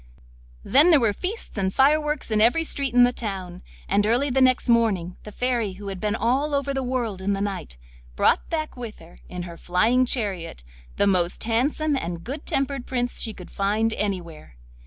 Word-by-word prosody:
Then 295 Hz, +6 st, +5 dB
there 320 Hz, -4 st, +6 dB
were 225 Hz, -5 st, +2 dB
feasts 380 Hz, -, -5 dB
and 190 Hz, -1 st, 0 dB
fireworks 300 Hz, +2 st, +2 dB
in 215 Hz, -1 st, +2 dB
every 245 Hz, +9 st, +4 dB
street 275 Hz, -5 st, -1 dB
in 245 Hz, -, +7 dB
the 245 Hz, 0 st, +3 dB
town, 190 Hz, -6 st, -5 dB, 0.3 s
and 205 Hz, -, +2 dB
early 245 Hz, +6 st, +1 dB
the 265 Hz, +1 st, +2 dB
next 255 Hz, -1 st, +3 dB
morning 215 Hz, -7 st, +2 dB
the 210 Hz, -, -8 dB
Fairy, 235 Hz, -3 st, -1 dB
who 200 Hz, +1 st, -8 dB
had 190 Hz, -2 st, -6 dB
been 210 Hz, 0 st, 0 dB
all 265 Hz, +7 st, +1 dB
over 280 Hz, 0 st, -1 dB
the 270 Hz, -, -1 dB
world 245 Hz, -6 st, -2 dB
in 200 Hz, +1 st, 0 dB
the 195 Hz, -, -2 dB
night, 195 Hz, -, -4 dB, 0.4 s
brought -, -, +2 dB
back 310 Hz, -2 st, -3 dB
with 235 Hz, -3 st, -7 dB
her, 165 Hz, +1 st, -16 dB
in 180 Hz, -1 st, -5 dB
her 170 Hz, -1 st, -9 dB
flying 225 Hz, +10 st, +2 dB
chariot, 190 Hz, -, -3 dB, 0.3 s
the 200 Hz, -, +3 dB
most 180 Hz, -3 st, +1 dB
handsome 280 Hz, +6 st, 0 dB
and 170 Hz, -9 st, -4 dB
good 280 Hz, +5 st, -7 dB
tempered 275 Hz, -2 st, -1 dB
Prince 245 Hz, -1 st, -2 dB
she 225 Hz, -, -2 dB
could 180 Hz, -4 st, -12 dB
find 215 Hz, +3 st, 0 dB
anywhere. 175 Hz, -, -4 dB
225 Hz, 195 wpm, -24 LUFS, 195-265 Hz, 0.4 s, in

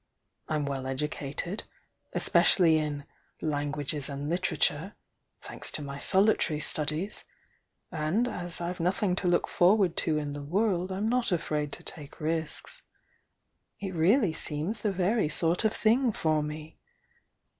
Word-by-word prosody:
I'm 150 Hz, -2 st, 0 dB
well 135 Hz, -2 st, -3 dB
educated 150 Hz, +7 st, -3 dB, 0.5 s
especially 165 Hz, -4 st, +4 dB
in 145 Hz, -2 st, -3 dB, 0.3 s
'languages 145 Hz, -1 st, -2 dB
and 140 Hz, +1 st, -4 dB
literature,' 180 Hz, 0 st, 0 dB, 0.5 s
tnanks -, -, -6 dB
to 150 Hz, -, -4 dB
my 140 Hz, 0 st, -6 dB
sohtaiy 190 Hz, -5 st, +3 dB
studies,— 155 Hz, +7 st, 0 dB, 0.7 s
and 175 Hz, +9 st, +1 dB
as 175 Hz, -7 st, -4 dB
I've 175 Hz, +1 st, -3 dB
nothing 180 Hz, +2 st, +1 dB
to 185 Hz, -, 0 dB
look 175 Hz, 0 st, +2 dB
for 185 Hz, +5 st, +4 dB
ward 185 Hz, -5 st, +2 dB
to 155 Hz, -2 st, +3 dB
m 145 Hz, -1 st, -3 dB
the 145 Hz, -, -5 dB
world 185 Hz, +3 st, 0 dB
I'm 195 Hz, +3 st, -1 dB
not 245 Hz, -1 st, +1 dB
afraid 150 Hz, -4 st, -1 dB
to -, -, -8 dB
take 145 Hz, -3 st, -9 dB
risks. 160 Hz, 0 st, -3 dB, 1.0 s
It 195 Hz, -2 st, -4 dB
really 180 Hz, -, +3 dB
seems 160 Hz, +8 st, -2 dB
the 210 Hz, -, +1 dB
very 190 Hz, -1 st, +1 dB
sort 170 Hz, +5 st, +1 dB
of 215 Hz, -, +4 dB
thing 235 Hz, +3 st, +3 dB
for 155 Hz, -6 st, +1 dB
me! 150 Hz, +1 st, -7 dB
165 Hz, 140 wpm, -29 LUFS, 150-190 Hz, 1.0 s, especially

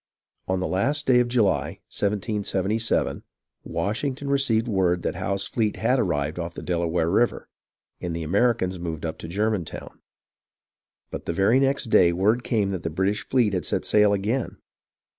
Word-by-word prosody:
On 95 Hz, 0 st, 0 dB
the 90 Hz, -, -1 dB
last 145 Hz, +11 st, 0 dB
day 125 Hz, -2 st, +5 dB
of 125 Hz, -, +2 dB
July, 115 Hz, -5 st, +1 dB, 0.2 s
1777, 105 Hz, +1 st, -1 dB, 0.4 s
Washington 135 Hz, +6 st, -3 dB
received 125 Hz, -5 st, +2 dB
word 90 Hz, -5 st, +1 dB
that -, -, -1 dB
Howe's 100 Hz, +2 st, -2 dB
fleet 110 Hz, -3 st, -1 dB
had -, -, +1 dB
arrived 75 Hz, +3 st, -1 dB
off 85 Hz, 0 st, -5 dB
the -, -, -7 dB
Delaware 85 Hz, -1 st, 0 dB
River, 115 Hz, +7 st, +1 dB, 0.5 s
and 85 Hz, -2 st, -3 dB
the 85 Hz, -, -3 dB
Americans 95 Hz, +1 st, +1 dB
moved 85 Hz, -2 st, -4 dB
up 80 Hz, -, -4 dB
to -, -, -7 dB
Germantown; 100 Hz, 0 st, -3 dB, 1.1 s
but -, -, -6 dB
the -, -, 0 dB
very 100 Hz, +8 st, +3 dB
next 135 Hz, -4 st, 0 dB
day 85 Hz, -, +6 dB
word 105 Hz, +7 st, +2 dB
came 105 Hz, -4 st, 0 dB
that 95 Hz, -3 st, -3 dB
the -, -, -3 dB
British 95 Hz, +5 st, 0 dB
fleet 120 Hz, -6 st, +1 dB
had 90 Hz, -, -1 dB
set -, -, -1 dB
sail 105 Hz, -1 st, +4 dB
again. 105 Hz, +6 st, -1 dB
100 Hz, 160 wpm, -24 LUFS, 90-115 Hz, 1.1 s, day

